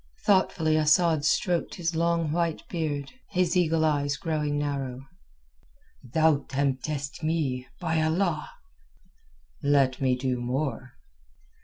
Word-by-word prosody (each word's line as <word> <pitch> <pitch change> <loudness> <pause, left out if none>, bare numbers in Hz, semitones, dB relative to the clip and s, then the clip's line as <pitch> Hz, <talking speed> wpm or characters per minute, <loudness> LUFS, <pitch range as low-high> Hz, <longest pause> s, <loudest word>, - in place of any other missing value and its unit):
Thoughtfully 180 -5 +3
Asad 155 0 +3
stroked 175 +2 +1
his 170 -1 -2
long 165 -1 +1
white 165 -1 -1
beard, 150 -5 -3 0.2
his 180 -2 +1
eagle 165 -3 +2
eyes 145 -2 +1
growing 150 -2 -1
narrow. 135 -3 -3 1.0
"Thou 155 +4 +3
temptest 140 +1 -2
me, 150 -6 -1
by 160 0 0
Allah!" 160 0 0 1.1
"Let 140 -3 +2
me 130 -1 +3
do 125 -1 -2
more...." 125 0 -3
155 Hz, 110 wpm, -27 LUFS, 135-165 Hz, 1.1 s, Thoughtfully